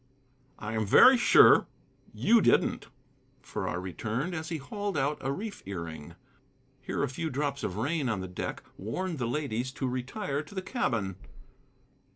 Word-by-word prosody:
"I 105 +1 -5
am 110 -1 0
very 255 - +8
sure 240 - +6 0.4
you 230 0 +4
didn't," - - +2 0.6
Farrar 90 - -3
returned, 110 - -3
as 160 -1 -4
he 165 - -2
hauled 205 +7 -4
out 145 +3 0
a 135 - -1
reef 205 +7 -5
earing. 85 -6 -6 0.7
Here - - -2
a - - +1
few 160 +5 -4
drops 140 0 -2
of 90 - -3
rain 145 +3 0
on 110 -4 -1
the 95 - -5
deck 90 - -5 0.2
warned 165 - -3
the 120 - -1
ladies 130 -2 -2
to 135 - -3
retire 135 - -3
to 180 +6 -13
the 190 - -2
cabin. 115 - -1
135 Hz, 160 wpm, -29 LUFS, 110-170 Hz, 0.7 s, very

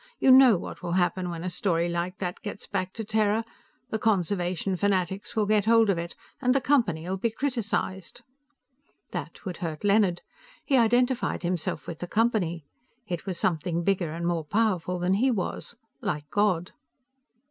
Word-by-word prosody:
You 265 - +5
know 255 -5 +8
what - - -8
will 175 -1 -3
happen 180 0 +1
when 170 -1 -5
a 185 - -2
story 170 -3 0
like 175 +1 -2
that 180 -2 -4
gets 205 -1 -6
back 185 -2 -2
to 225 - -5
Terra. 215 +1 +1 0.5
The 220 - -1
conservation 185 -3 0
fanatics 190 +1 -1
will 215 -2 +2
get 210 -1 +2
hold 225 -2 +5
of 175 - -1
it, 170 0 -6 0.3
and 250 0 +3
the - - +5
Company'll 190 - +1
be 230 +5 0
criticized." 225 -5 -3 0.9
That - - -6
would 180 -2 -4
hurt 160 -3 -5
Leonard. 200 -4 +3 0.4
He 275 - +2
identified 245 -1 +2
himself 175 -2 -2
with 170 -2 -7
the 175 - -5
Company. 190 -8 0 0.4
It 175 +2 -5
was 185 -3 -2
something 170 0 0
bigger 180 -4 0
and 170 +2 -4
more 170 -2 0
powerful 185 -2 0
than 180 +1 +1
he 240 +7 +3
was, 230 +1 -3 0.3
like 150 -9 -3
God. 195 -4 +1
190 Hz, 170 wpm, -27 LUFS, 175-220 Hz, 0.9 s, know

